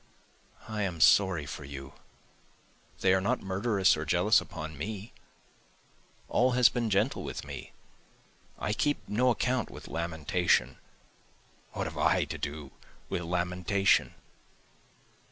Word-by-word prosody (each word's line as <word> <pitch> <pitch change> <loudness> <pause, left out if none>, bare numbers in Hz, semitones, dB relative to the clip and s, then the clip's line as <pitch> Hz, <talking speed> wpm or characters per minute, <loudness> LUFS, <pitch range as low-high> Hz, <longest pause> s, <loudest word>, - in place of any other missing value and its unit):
I 110 -1 -3
am 90 -4 -2
sorry 90 -2 +5
for 75 +1 -7
you, 70 0 -9 1.1
they 95 - +4
are 95 - +2
not 100 - 0
murderous 100 +1 +2
or - - -4
jealous - - +3
upon 80 0 -7
me, 100 - -6 1.1
All 125 +1 +2
has 125 -1 +6
been 120 -3 -2
gentle 105 +7 +1
with - - -6
me, - - -8 0.9
I 105 - -2
keep 145 +6 -1
no 125 +5 +2
account 125 0 0
with - - -11
lamentation, 85 +1 0 0.9
(What - - -3
have - - -6
I 90 -1 +3
to 80 +2 -6
do 75 -1 -5 0.4
with - - -2
lamentation?) 90 +3 +1
95 Hz, 125 wpm, -29 LUFS, 80-110 Hz, 1.1 s, has